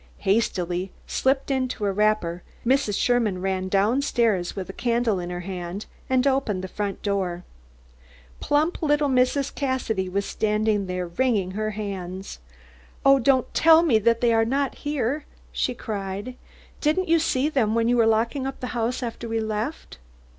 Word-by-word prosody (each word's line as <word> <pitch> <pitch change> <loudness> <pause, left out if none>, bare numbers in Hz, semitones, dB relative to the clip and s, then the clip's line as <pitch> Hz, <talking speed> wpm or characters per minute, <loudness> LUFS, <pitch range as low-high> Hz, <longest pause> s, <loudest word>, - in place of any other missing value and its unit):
Hastily 185 -3 0
slipping 270 +1 +1
into 255 -5 -2
a 200 - +2
wrapper, 200 -4 +1 0.2
Mrs. 255 -5 +2
Sherman 230 -6 +1
ran 190 0 -1
down 205 +8 +2
stairs 225 -10 +1
with 190 -2 -5
a 195 - -7
candle 235 -4 0
in 175 0 -5
her 175 0 -4
hand, 180 +1 -5 0.2
and 260 0 +2
opened 265 -9 +1
the - - -3
front 200 +1 -4
door. 185 -4 -1 1.0
Plump 310 +6 +1
little 295 -2 +2
Mrs. 260 +2 +2
Cassidy 250 -9 -1
was 200 +2 -1
standing 210 -2 0
there, 180 0 -2
wringing 195 0 0
her 215 +2 -2
hands. 190 - -5 0.7
"Oh, 275 0 +7
don't 260 0 +2
tell 325 0 +6
me 250 -10 +4
that 230 +2 +2
they 235 -1 +3
are 225 0 +4
not 270 +4 0
here!" 290 0 -1 0.3
she 250 - -1
cried. 205 +2 -5 0.5
"Didn't 315 +5 +1
you 330 0 +4
see 285 -3 +1
them 235 -8 +1
when 230 0 +2
you 245 - +3
were 230 -1 +4
locking 230 +5 +1
up 270 - -6
the 250 - -4
house 240 +2 -1
after 235 0 -5
we 225 0 0
left? 220 - -4
225 Hz, 165 wpm, -24 LUFS, 195-260 Hz, 1.0 s, Oh